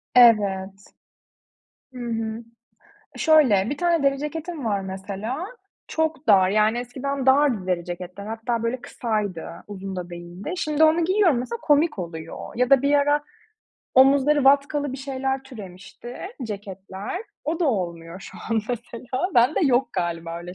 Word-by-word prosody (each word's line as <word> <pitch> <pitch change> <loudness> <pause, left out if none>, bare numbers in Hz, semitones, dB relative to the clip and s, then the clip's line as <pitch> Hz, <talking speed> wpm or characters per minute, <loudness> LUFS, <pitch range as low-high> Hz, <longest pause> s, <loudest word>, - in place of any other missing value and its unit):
Evet, 200 -5 +4 1.1
hı 250 - -9
hı. 225 -1 -3 0.7
Şöyle, 255 - +4
bir 290 - -3
tane 340 -3 +2
deri 275 0 +2
ceketim 310 +1 -5
var, 205 -3 0
mesela. 200 - -5 0.4
Çok 315 -2 -1
dar, 190 -4 +6
yani, 215 +3 +3
eskiden 265 +2 -4
dardı 265 -7 +4
deri 180 -2 0
ceketler. 180 +3 -7
Hatta, 225 +1 -2
böyle, 235 +2 -2
kısaydı, 210 -8 -3 0.2
uzun 195 -2 -7
da 180 -1 -5
değildi. 175 - -7
Şimdi 310 -3 +2
onu 320 +2 +4
giyiyorum 370 - +3
mesela 255 - -4
komik 295 -2 +3
oluyor. 165 -2 -6 0.2
Ya 250 +1 +1
da 270 -2 +6
bir 285 +1 +3
ara 290 +1 +3 0.7
omuzları 275 +2 +5
vatkalı 285 0 +3
bir - - -4
şeyler 270 0 -3
türemişti, 225 -1 -10 0.3
ceketler. 200 - -6 0.2
O 320 +3 -2
da - - +3
olmuyor 170 -5 -3
şu - - -11
an 225 -1 +2
mesela. 245 +5 -3
Ben 245 +5 +5
de - - +1
yok 255 -1 +2
galiba, 170 -1 -3
öyle 175 +1 -9
240 Hz, 145 wpm, -24 LUFS, 195-280 Hz, 1.1 s, dar